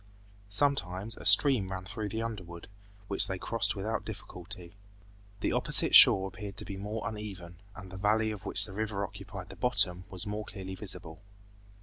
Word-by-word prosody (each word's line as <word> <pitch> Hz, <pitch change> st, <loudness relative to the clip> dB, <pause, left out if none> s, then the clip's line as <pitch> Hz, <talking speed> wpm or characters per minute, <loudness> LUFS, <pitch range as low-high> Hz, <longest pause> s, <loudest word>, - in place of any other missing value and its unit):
Sometimes 100 Hz, -4 st, -1 dB
a -, -, -11 dB
stream 105 Hz, +1 st, +6 dB
ran 95 Hz, 0 st, -6 dB
through 105 Hz, +2 st, -5 dB
the 110 Hz, +3 st, -4 dB
underwood, 90 Hz, -7 st, -8 dB, 0.4 s
which 100 Hz, -, +4 dB
they 95 Hz, -, -4 dB
crossed 100 Hz, 0 st, 0 dB
without 105 Hz, +3 st, -3 dB
difficulty. 90 Hz, -4 st, -9 dB, 0.7 s
The -, -, -1 dB
opposite -, -, +3 dB
shore 95 Hz, 0 st, +8 dB
appeared 100 Hz, +1 st, -9 dB
to -, -, -6 dB
be 100 Hz, -, -7 dB
more 105 Hz, +2 st, -5 dB
uneven, 95 Hz, -6 st, -8 dB
and 95 Hz, -3 st, -11 dB
the 95 Hz, -, -9 dB
valley 110 Hz, +2 st, +1 dB
of 105 Hz, -3 st, -8 dB
which -, -, +7 dB
the 95 Hz, -, -5 dB
river 105 Hz, -1 st, -3 dB
occupied -, -, -10 dB
the -, -, -11 dB
bottom 90 Hz, -8 st, +1 dB
was 95 Hz, -2 st, -5 dB
more 105 Hz, +1 st, -5 dB
clearly 95 Hz, -2 st, -8 dB
visible. 85 Hz, -1 st, -2 dB
100 Hz, 175 wpm, -29 LUFS, 95-110 Hz, 0.7 s, shore